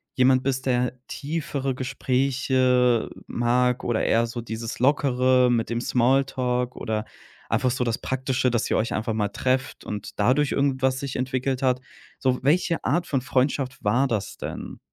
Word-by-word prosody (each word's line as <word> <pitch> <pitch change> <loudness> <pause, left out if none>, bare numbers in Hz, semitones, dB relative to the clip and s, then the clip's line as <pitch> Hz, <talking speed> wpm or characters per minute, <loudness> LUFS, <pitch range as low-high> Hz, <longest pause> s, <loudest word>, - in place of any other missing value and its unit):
jemand 130 0 +4
bist, 130 -1 -1
der 125 0 +1
tiefere 140 -3 -3
Gespräche 130 -2 +1 0.2
mag, 125 +1 +1
oder 120 -2 0
eher 115 +1 +3
so 120 +1 -5
dieses 115 0 -6
Lockere 130 -2 +3
mit 115 -2 0
dem 120 0 -1
Smalltalk 125 0 +1
oder 110 -1 -3 0.4
einfach 125 +2 +1
so 125 0 -1
das 115 -1 0
Praktische, 130 -1 0
dass 120 -2 0
ihr - - +1
euch 115 - 0
einfach 110 +1 -1
mal 105 -2 0
trefft 130 +4 -1
und 105 0 -6
dadurch 130 +7 +3
irgendwas 130 -2 +1
sich 140 -2 -5
entwickelt 130 +1 -1
hat, 125 -1 +2 0.4
so 130 -1 +1
welche 170 +3 +2
Art 175 0 +1
von 135 -3 0
Freundschaft 130 +1 0
war 120 +7 +3
das 110 -6 -3
denn? - - -6
125 Hz, 155 wpm, -24 LUFS, 120-135 Hz, 0.4 s, jemand